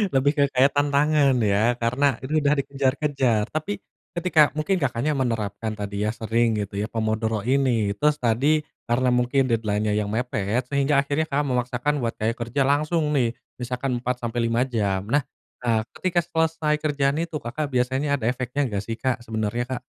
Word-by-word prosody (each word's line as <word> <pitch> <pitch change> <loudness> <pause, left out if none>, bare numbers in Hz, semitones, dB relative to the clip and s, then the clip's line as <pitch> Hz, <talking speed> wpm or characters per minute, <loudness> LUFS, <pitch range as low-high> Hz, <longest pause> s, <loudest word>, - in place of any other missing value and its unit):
Lebih 135 +2 +4
ke 145 - +5
kaitan 140 +2 +3
tangan 145 -2 +4
ya 105 +3 +3
karena 125 +3 +2
itu 150 +4 -1
udah 145 +1 +3
dikejar-kejar. 135 -4 +1
Tapi 180 +6 -3 0.4
ketika 165 -4 +4
mungkin 185 +5 +1
Kakaknya 140 +3 0
menerapkan 110 -3 -2
tadi 100 0 -3
ya, 105 - +1
sering 115 0 +1
gitu 100 0 -9
ya, 105 - -2
pomodoro 110 -1 -1
ini, 125 -6 +2
terus 150 +5 +2
tadi 135 +7 +2 0.3
karena 125 +2 +2
mungkin 125 +2 +2
deadline-nya 105 -2 0
yang 105 -1 0
mepet, 115 0 -1
sehingga 140 0 +2
akhirnya 145 +3 -1
Kakak 145 +1 0
memaksakan 125 +2 0
buat 115 -1 -1
kaya 110 +1 0
kerja 120 +4 -2
langsung 150 +2 +1
nih. 120 -5 +2 0.3
Misalkan 125 +1 -2
4-5 120 -1 -1
jam. 100 -6 -1
Nah, 145 +3 +3 0.4
eee, 115 -2 +2 0.2
ketika 180 -2 +1
selesai 160 -2 0
kerjaan 145 -2 +1
itu, 165 -2 -3
Kakak 140 +5 -3
biasanya 130 +3 0
ada 115 - -5
efeknya 130 +3 -1
nggak 100 -2 -3
sih, 115 0 -4
Kak, 130 -1 -1
sebenarnya, 110 +2 -2
Kak? - - -9
125 Hz, 165 wpm, -24 LUFS, 115-145 Hz, 0.4 s, ke